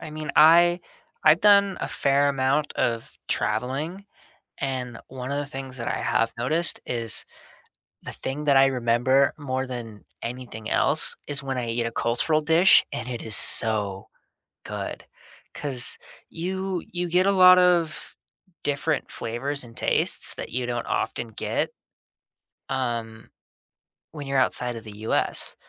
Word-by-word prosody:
I 160 - -8
mean, 155 0 -5
I 170 +3 +6 0.4
I've 155 +2 +6
done 200 -2 +5
a - - -3
fair 140 +1 +2
amount 140 +2 0
of 115 -1 -1 0.2
traveling, 135 - -2 0.6
and 125 -3 -3
one 130 +1 -7
of 140 - -1
the 145 - -2
things 135 -2 -8
that 115 - -5
I - - -1
have 115 0 0
noticed 155 +8 +1
is, 115 -2 -1 0.8
the - - -6
thing 145 +3 -5
that 140 -2 +4
I 135 0 +6
remember 130 +2 +2
more 130 -2 -3
than 115 -5 -8 0.2
anything 120 -2 -7
else, - - +1
is 145 -1 -2
when 135 -1 -3
I 120 -2 -3
eat 115 +1 -1
a 115 - -3
cultural 120 +8 0
dish 165 +4 +5
and 120 - -4
it 120 -2 -5
is 110 -2 +3
so 105 -4 +3 0.6
good, - - -6 0.5
'cause 135 -5 +1 0.3
you 190 +1 -4
you 175 0 -2
get 180 +2 +3
a 200 - +4
lot 185 -1 +7
of 175 -3 +1 0.5
different 145 +1 -1
flavors 135 +5 -4
and 115 -1 -15
tastes - - 0
that - - -7
you 125 0 -2
don't 120 -1 -3
often 115 - -2
get, 110 - -2 1.0
um, 115 -4 -4 0.8
when 145 -3 -8
you're 135 0 0
outside 125 -1 0
of 115 - -8
the 105 -1 -11
US. 110 - -1
135 Hz, 150 wpm, -24 LUFS, 120-155 Hz, 1.0 s, lot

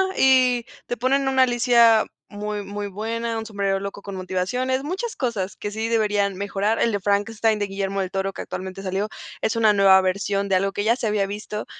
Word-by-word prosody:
y 255 -2 +4 0.2
te - - -3
ponen 265 +3 +1
una 265 -1 +4
Alicia 235 -2 +4 0.3
muy, 210 0 -4
muy 205 +1 -5
buena, 225 +3 -3
un 220 - -6
sombrerero 200 -2 -1
loco 200 0 -7
con 200 - -7
motivaciones, 190 +9 -1
muchas 380 +10 -4
cosas 205 -7 -2
que 205 - -5
sí 220 +2 -2
deberían 205 -4 +1
mejorar. 200 +2 -1
El 230 - +2
de 205 - -1
Frankenstein 210 +3 +1
de 205 - -1
Guillermo 195 0 -2
del 185 -1 -4
Toro, 195 0 -2
que - - -6
actualmente 190 +1 -6
salió, 195 +2 -1 0.3
es 220 - 0
una 220 -2 +4
nueva 195 -1 +6
versión 200 +1 -1
de 195 - -1
algo 195 +1 +1
que 205 - -3
ya 230 +2 +3
se 245 - -2
había 210 -2 +1
visto 210 +1 -5
210 Hz, 205 wpm, -23 LUFS, 195-230 Hz, 0.3 s, nueva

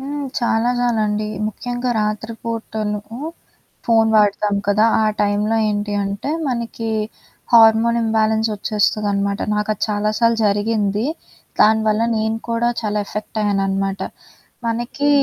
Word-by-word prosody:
హ్మ్. 285 +1 -4
చాలా 235 0 +1
చాలండి. 215 -3 0 0.2
ముఖ్యంగా 245 +3 -3
రాత్రి 215 +2 -2
పూటలు 220 -2 -3 0.9
ఫోన్ 225 -1 +4
వాడతాం 205 -1 +2
కదా! 205 +2 +4 0.2
ఆ - - +2 0.2
టైం‌లో 205 +2 +1
ఏంటి 205 0 -2
అంటే 200 +7 -3 0.2
మనకి 235 -2 -3 0.6
హార్మోనింబాలెన్స్ 225 -1 +4
ఒచ్చేస్తదనమాట. 205 -1 0
నాకది 210 -1 -2
చాలా 210 0 0
సార్లు 230 -1 +3
జరిగింది. 205 +1 0 0.5
దానివల్ల 220 0 +4
నేను 220 +1 0
కూడా 230 +1 +1
చాలా 210 -2 -1
ఎఫెక్టయ్యాననమాట. 195 -2 -1 0.7
మనకి 240 +5 -1
215 Hz, 100 wpm, -20 LUFS, 205-230 Hz, 0.9 s, ఫోన్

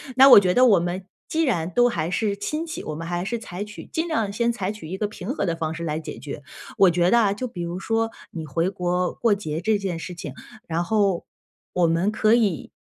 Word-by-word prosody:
那 270 +2 +8
我 - - +11
觉 180 -2 +1
得 255 - +6
我 205 -8 +6
们， 180 +2 -3 0.2
既 325 +1 0
然 175 - 0
都 245 +6 +4
还 165 -6 -2
是 200 +1 -1
亲 305 +9 -3
戚， 320 - -6
我 155 - -5
们 165 +2 -6
还 175 +1 -2
是 235 +4 -2
采 200 -3 -6
取 210 0 -10
尽 325 +1 -2
量 225 -11 0
先 235 +3 +1
采 195 -4 -2
取 210 -7 -9
一 190 +3 -5
个 210 - -1
平 205 0 -8
和 - - -1
的 170 -3 0
方 160 -1 -3
式 170 - -6
来 155 -1 -2
解 - - -8
决。 145 -1 -7 0.3
我 195 -3 +7
觉 175 +1 +2
得 235 - +6
啊， 205 -4 +3
就 255 +5 -4
比 180 -7 -7
如 170 +2 -4
说 225 +2 0 0.2
你 160 -2 -6
回 165 +5 0
国 180 -1 -1
过 230 -3 +2
节 160 -6 -4
这 215 +3 +1
件 190 -4 -3
事 180 - -6
情， 150 -5 -7 0.3
然 170 +1 -1
后 200 -2 +1 0.5
我 175 -2 +3
们 170 +6 +1
可 215 0 +3
以， 205 -9 0
190 Hz, 265 characters per minute, -24 LUFS, 170-220 Hz, 0.5 s, 我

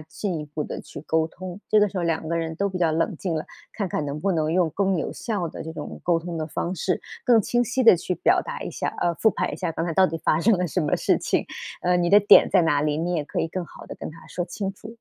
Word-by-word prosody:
进 165 +3 -4
一 150 - -7
步 150 0 -4
地 - - -6
去 145 - -10
沟 160 0 +1
通， 185 +3 -8
这 215 - +5
个 210 - +5
时 190 - -4
候 175 - -1
两 165 -1 -1
个 170 +1 -1
人 160 -1 -3
都 200 - 0
比 190 -2 -3
较 170 -2 +3
冷 165 +3 0
静 175 -4 -2
了， 155 - -2 0.3
看 200 - -2
看 160 - -2
能 140 +1 -4
不 195 +5 0
能 155 -2 0
用 170 -1 +2
更 195 +3 +1
有 160 - -2
效 205 -6 -3
的 160 - -7
这 160 - -6
种 - - -7
沟 170 -1 +2
通 170 0 -5
的 155 - -2
方 170 +3 -3
式， 180 +1 -1 0.2
更 240 -2 +5
清 240 +4 +1
晰 255 +2 0
地 225 - +9
去 180 - -2
表 - - +3
达 - - -6
一 - - -5
下 - - -3
呃， 170 - +2
复 220 - +4
盘 - - -2
一 - - -4
下 180 -3 -2
刚 165 +1 -2
才 170 - -2
到 190 +3 +5
底 165 - -3
发 155 - +3
生 210 +3 +4
了 180 0 0
什 180 +3 -1
么 150 -3 +1
事 - - +2
情， - - 0 0.4
呃， 180 0 +3
你 175 - +1
的 200 +3 +8
点 205 0 +7
在 - - +5
哪 145 -3 +2
里， 150 0 0
你 170 +3 -1
也 160 -4 0
可 - - -2
以 165 - -2
更 185 +2 -3
好 - - -13
地 - - -8
跟 - - -7
他 165 - -14
说 175 - -3
清 195 +2 -4
楚， 210 - -13
175 Hz, 325 characters per minute, -24 LUFS, 160-190 Hz, 0.4 s, 地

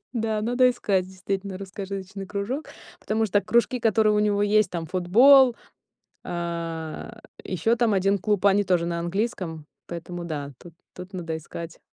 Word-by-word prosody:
Да, 220 -2 -1
надо 245 +3 +4
искать 195 -6 0
действительно 190 +1 -4
русскоязычный 195 0 -6
кружок, 210 +10 -3 0.3
потому 220 +1 0
что 205 0 +2
кружки, 235 +3 +1
которые 220 -2 +3
у 210 - +2
него 205 -1 +2
есть: 210 0 +3
там 165 -2 -4
футбол, 245 - +6 0.7
а, 170 +4 -5 0.2
ещё 190 +6 0
там 235 -2 +2
1 195 +1 +2
клуб, 205 0 +1
они 200 +1 +4
тоже 175 -3 +1
на 170 0 -2
английском, 175 -4 -3 0.2
поэтому 170 +1 -6
да, 145 -4 -5
тут 175 - -13 0.2
тут 180 +2 -10
надо 165 -3 -4
искать. 165 +1 -8
195 Hz, 150 wpm, -25 LUFS, 175-215 Hz, 0.7 s, футбол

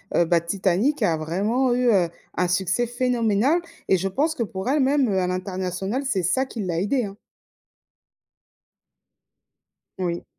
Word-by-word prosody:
heu, - - +5
bah, 170 0 +3
Titanic 195 - 0
a 165 -5 +2
vraiment 210 +11 0
eu, 250 0 +2
heu, 180 -5 +3 0.3
un 180 - +2
succès 190 +6 0
phénoménal 245 - +1 0.3
et 190 - +5
je 190 +2 -1
pense 295 - 0
que 235 - -1
pour 190 +2 -4
elle 295 +3 +2
même, 270 -1 +3
heu, 190 -2 +1
à 180 - 0
l'international 185 +5 -3
c'est 195 -9 0
ça 260 +10 +1
qui 235 -4 -6
l'a 170 -3 -1
aidée, 240 +7 +1
hein. 195 0 -9 2.8
Oui. 175 -2 -3
200 Hz, 155 wpm, -23 LUFS, 180-250 Hz, 2.8 s, heu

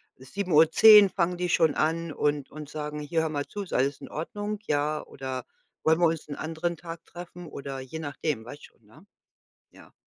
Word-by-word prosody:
7:10 185 +7 +6
fangen 180 -1 0
die 180 0 -2
schon 160 -3 +3
an 165 0 0
und 145 -2 -1
und 150 -1 -9
sagen: 150 0 -5
„Hier, 160 +2 0
hör 160 - -1
mal 145 -2 -2
zu, 205 - -6
ist 190 - -10
alles 140 +2 +1
in - - -9
Ordnung? 205 +6 -4
Ja, 150 +1 0
oder 130 -2 -6 0.4
wollen 160 +1 +3
wir 175 - +5
uns 160 -2 -3
'n 145 - -4
anderen 165 +2 -3
Tag 165 0 -9
treffen?” 175 0 -10
oder 135 -2 -6
je 130 +5 -7
nachdem, 145 -5 -3
weißt 145 +4 -10
schon, 115 - -31
ne? 130 - -19 0.7
Ja. - - -18
155 Hz, 190 wpm, -27 LUFS, 145-175 Hz, 0.7 s, 7:10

